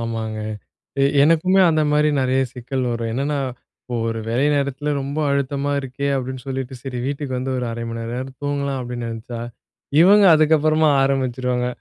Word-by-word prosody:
ஆமாங்க. 115 -1 -3 0.6
எ - - +5 0.2
எனக்குமே 165 +5 +4
அந்த 155 -1 +2
மாரி 150 0 +3
நெறைய 130 0 +1
சிக்கல் 130 +1 -3
வரும். 115 -1 -3
என்னன்னா, 140 +4 -1 0.4
"இப்போ 125 - -5
ஒரு 115 0 -3
வேலை 125 +5 +1
நேரத்தில 140 +1 -1
ரொம்ப 140 +2 -4
அழுத்தமா 140 +1 -1
இருக்கே." 135 +1 -4
அப்படீன்னு 130 -1 -5
சொல்லிட்டு, 130 -1 -4
"சரி 130 -2 -5
வீட்டுக்கு 140 -2 -3
வந்து 130 +1 -2
ஒரு 125 - -2
0:30 115 0 -5
மணி 115 - -5
நேரமாவது 125 +3 -5
தூங்கலாம்." 140 -1 -1
அப்படீன்னு 120 -1 -5
நெனைச்சா, 115 +1 -6 0.6
இவங்க 200 +4 +7
அதுக்கப்பறமா 155 0 +3
ஆரம்பிச்சுருவாங்க. 130 -2 0
135 Hz, 160 wpm, -21 LUFS, 125-145 Hz, 0.6 s, இவங்க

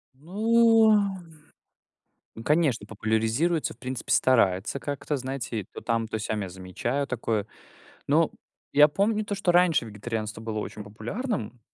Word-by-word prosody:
Ну, 220 - +4 1.5
конечно, 145 -8 +2
популяризируется, 110 +10 0
в - - -32
принципе, 130 0 -4
старается 115 -1 +2
как-то, 145 +1 -3
знаете, 130 -5 -4
то - - -8
там, 115 -1 -1
то 110 - -3
сям 110 0 -2
я 95 - -4
замечаю 95 +10 -3
такое. 110 -5 -2 0.6
Но - - +3 0.4
я 150 +1 +8
помню 210 +7 0
то, 205 - -3
что 195 -2 0
раньше 175 -7 +4
вегетарианство 110 0 -5
было 110 -1 -4
очень 105 0 -6
популярным. 120 - -4
125 Hz, 130 wpm, -26 LUFS, 110-170 Hz, 1.5 s, я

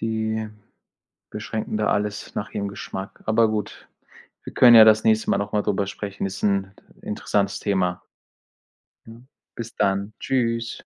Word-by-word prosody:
die 110 -1 -2 0.8
beschränken 110 0 -5
da 105 -1 0
alles 105 0 -2
nach 105 - -3
ihrem 100 -1 -3
Geschmack. 95 -1 -8
Aber 110 0 +3
gut, 105 -2 -5 0.6
wir - - -9
können 120 -2 +7
ja 110 - +11
das 110 0 +5
nächste 110 0 +2
Mal - - +2
nochmal 105 +1 -1
darüber 100 -1 -1
sprechen. 100 -1 -5
Ist 95 - -7
'n 100 -1 0 0.3
interessantes 105 -1 -1
Thema. 90 -3 -1 1.0
Mhm. 115 +3 -14 0.3
Bis 115 -1 -7
dann. 100 +1 0
Tschüss. 115 -3 -1
105 Hz, 140 wpm, -23 LUFS, 100-110 Hz, 1.0 s, ja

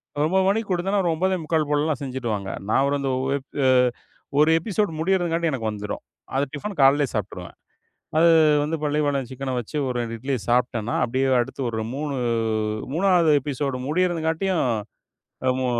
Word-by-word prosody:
ஒரு 145 +1 +1
9:00 190 +2 +2
மணிக்கு 220 +1 0
குடுத்தோன்ன, 195 +3 +1
ஒரு 170 - +2
9:45 160 -4 0
போலல்லாம் 150 -1 0
செஞ்சிருவாங்க. 120 -7 -3 0.2
நா - - +2
ஒரு 145 - +1
அந்த 135 -1 -1 0.2
1 140 +1 +1 0.3
எ - - +5 0.7
1 155 +2 +5
எபிசோட் 205 +2 -1
முடியறதுங்காட்டி 170 -2 +1
எனக்கு 115 -5 -2
வந்துரும். 105 0 -5 0.3
அது 135 - +2
டிஃபனு 200 +8 -5
காலையிலே 140 +1 +5
சாப்பிட்டுருவேன். 95 -4 -5 0.6
அது 170 +1 +6 0.4
வந்து 160 +2 -1
பள்ளிப்பாளையம் 145 -3 0
சிக்கன 130 0 -4
வச்சு 120 - -8
ஒரு 125 - -2
2 115 -1 -3
இட்லிய 130 +2 -2
சாப்பிட்டேன்னா, 120 -2 +1
அப்படியே 130 +3 0
அடுத்து 130 +3 -4
ஒரு 110 -1 -3
3- 145 0 -3 0.8
3ஆவது 175 -2 +4
எபிசோட் 140 -1 -2
முடியறதுங்காட்டியும், 170 +1 0 0.8
அ - - +5
மு 130 - 0
145 Hz, 150 wpm, -23 LUFS, 130-170 Hz, 0.8 s, அது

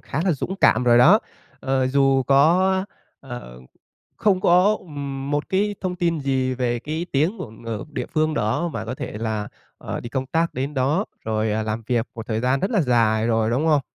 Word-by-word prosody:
khá 140 - -4
là 185 - +3
dũng 185 +6 -4
cảm 125 - +4
rồi 120 -1 +5
đó. 180 - +7 0.4
Ờ, 130 -1 0
dù 135 0 +3
có 175 +8 +3 0.4
ờ, 120 - -9 0.6
không 195 -3 +2
có 185 +5 +4 0.5
một 145 0 -1
cái 205 +2 0
thông 185 -1 -2
tin 170 -2 0
gì 130 -2 0
về 120 -2 -1
cái 155 +6 -4
tiếng 160 +11 +1
của 175 -12 -6
ng 115 0 -6
địa 125 -3 -3
phương 155 -1 +1
đó 145 +6 0
và 115 -8 -5
có 120 - -4
thể - - -6
là, 110 -2 -3 0.3
à, - - -5
đi 120 - -8
công 130 +1 -2
tác 165 +5 0
đến 135 +3 -3
đó 145 +9 +1 0.2
rồi 110 0 0 0.2
làm 110 +1 -3
việc 120 -2 +1
một 115 0 -7
thời 110 -1 -1
gian 130 +3 +1
rất 195 - -1
là 210 -7 +3
dài 115 -4 +2
rồi, 110 -1 +1
đúng 130 +7 0
không? 150 -3 +4
135 Hz, 200 wpm, -22 LUFS, 120-170 Hz, 0.6 s, đó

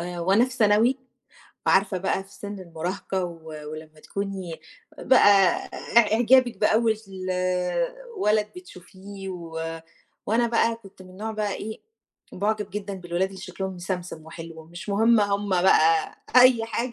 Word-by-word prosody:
آآ 175 0 -5
وأنا 195 +7 +4
في 255 - -6
ثانوي، 230 +2 +3 0.7
وعارفة 190 -1 +3
بقى 190 +1 -1
في 195 - -20
سن 205 -1 -8
المراهقة 185 +2 -4
و 165 -2 -9 0.2
ولمّا 155 0 -10
تكوني 195 -3 -5
إ - - -14 0.5
بقى 200 -7 +6 0.4
إع 220 -3 +6
إعجابك 245 +2 +4
بأول 220 +1 +3 1.2
ولد 210 - +2
بتشوفيه، 195 - -11
و 165 -2 -6 0.5
وأنا 235 +3 +2
بقى 230 0 +2
كنت 195 -4 -15
من 185 - -14
النوع 210 +4 -5
بقى 210 -2 -2
إيه، 220 +1 -7 0.5
باعُجَب 210 +1 -1
جدًا 200 0 -5
بالولاد 180 0 -2
اللي 190 -1 -11
شكلهم 190 0 -5
مسمسم 180 -3 -5
وحلو، 165 0 -10
مش 175 +6 -11
مهم 225 +3 +4
هُم 200 0 0
بقى 165 -3 +4 0.2
أي 250 -2 +7
حاجة 235 +2 -3
195 Hz, 140 wpm, -25 LUFS, 175-220 Hz, 1.2 s, أي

